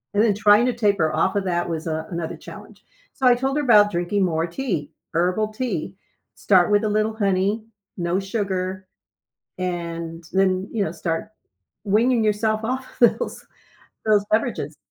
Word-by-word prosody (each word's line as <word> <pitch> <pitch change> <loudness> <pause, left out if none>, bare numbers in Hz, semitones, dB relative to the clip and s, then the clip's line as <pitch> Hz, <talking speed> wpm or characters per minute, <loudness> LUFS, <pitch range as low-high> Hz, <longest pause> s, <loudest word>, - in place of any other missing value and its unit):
And 210 - +4
then 220 - +3
trying 210 +3 +5
to 250 - +1
taper 200 -8 +1
off 190 - +1
of 200 - +1
that 175 -1 -1
was, 165 0 -4
uh, 160 0 -2
another 170 -2 -4
challenge, - - -12 0.3
so 265 - +1
I 245 - +6
told 270 +3 -1
her 295 - 0
about 210 -5 +6
drinking 175 +3 0
more 165 -1 0
tea 175 - -3 0.2
herbal 185 +6 0
tea. 210 -7 -3 0.4
Start 185 -1 +3
with 205 +1 +3
a 215 - +1
little 215 +1 +1
honey, 200 +1 0 0.3
no 175 +1 0
sugar, 190 -2 -3 0.7
and 170 -2 -4
then, 190 0 +1
you 220 -3 0
know, - - -3
start 165 +5 -3 0.6
weaning 225 +3 +3
yourself 215 +1 +1
off 255 +3 -3
of 235 - +6
those - - -5 0.6
those 210 -2 +4
beverages. 215 - 0
200 Hz, 165 wpm, -22 LUFS, 175-215 Hz, 0.7 s, I